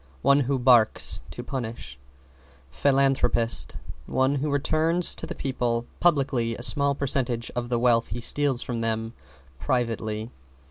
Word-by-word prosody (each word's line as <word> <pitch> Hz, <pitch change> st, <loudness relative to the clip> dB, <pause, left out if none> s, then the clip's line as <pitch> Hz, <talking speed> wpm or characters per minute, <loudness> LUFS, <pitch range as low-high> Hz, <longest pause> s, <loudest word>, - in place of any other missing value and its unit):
One 140 Hz, +1 st, +5 dB
who 135 Hz, 0 st, 0 dB
barks 120 Hz, -3 st, +3 dB
to -, -, -7 dB
punish. 115 Hz, -, -6 dB, 0.7 s
=PHILANTHROPIST= 135 Hz, -, +1 dB, 0.3 s
One 130 Hz, +1 st, +1 dB
who 145 Hz, +3 st, -2 dB
returns 155 Hz, +4 st, +1 dB
to -, -, -7 dB
the -, -, -6 dB
people 120 Hz, -3 st, -2 dB
publicly 135 Hz, -8 st, +1 dB
a 120 Hz, -, -6 dB
small 140 Hz, +1 st, +2 dB
percentage 125 Hz, -4 st, -1 dB
of 120 Hz, 0 st, -3 dB
the 120 Hz, -, +1 dB
wealth 120 Hz, -1 st, +2 dB
he 120 Hz, -, -5 dB
steals 135 Hz, +1 st, +2 dB
from 120 Hz, -2 st, -4 dB
them 115 Hz, 0 st, -2 dB, 0.5 s
privately. 115 Hz, -, -2 dB
125 Hz, 135 wpm, -25 LUFS, 115-140 Hz, 0.7 s, One